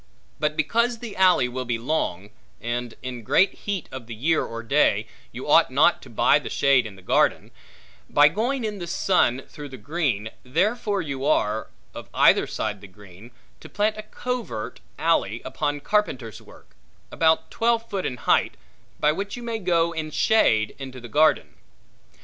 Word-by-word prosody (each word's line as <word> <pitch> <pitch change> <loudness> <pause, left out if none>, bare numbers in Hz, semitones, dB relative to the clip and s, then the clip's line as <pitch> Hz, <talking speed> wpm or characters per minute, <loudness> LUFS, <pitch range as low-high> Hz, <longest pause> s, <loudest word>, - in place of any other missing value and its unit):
But 150 0 -1
because 235 +9 +1
the 225 -3 -8
alley 185 -9 +4
will 130 +1 -4
be 120 -2 -2
long, 115 - -2 0.3
and, 120 0 -4
in 125 -2 -5
great 185 - +3
heat 200 -5 -4
of 130 -3 -8
the 115 - -7
year 160 +8 +1
or 115 0 -6
day, 115 - +2 0.3
you - - -8
ought - - +5
not - - +3
to - - -13
buy - - +3
the - - -7
shade 135 -4 +3
in 100 - -12
the 95 - -17
garden, - - +1 0.6
by 145 0 +6
going 235 - -1
in 210 -2 -3
the 175 - -6
sun 135 -8 +1
through 145 -2 -9
the 130 - -9
green, 120 - -2
therefore 200 - 0
you 140 -3 -5
are, 110 -7 +1 0.3
of - - -9
either - - +5
side 105 -2 -4
the 100 - -11
green, 100 +2 -15 0.3
to - - -12
plant 210 +1 0
a 215 - -6
covert 230 - -5 0.2
alley - - +1
upon 145 -1 -2
carpenter's 135 - -1
work, - - -18 0.4
about 160 0 +2
twelve 230 0 +1
foot 195 -4 -3
in 125 - -3
height, - - +1 0.4
by 150 - +3
which 200 +7 -4
you 240 - -8
may 230 -1 -3
go 170 -3 +1
in 160 -2 -4
shade 110 - +2
into 130 -1 -8
the 120 - -10
garden. 155 +4 +2
150 Hz, 175 wpm, -24 LUFS, 120-200 Hz, 0.6 s, by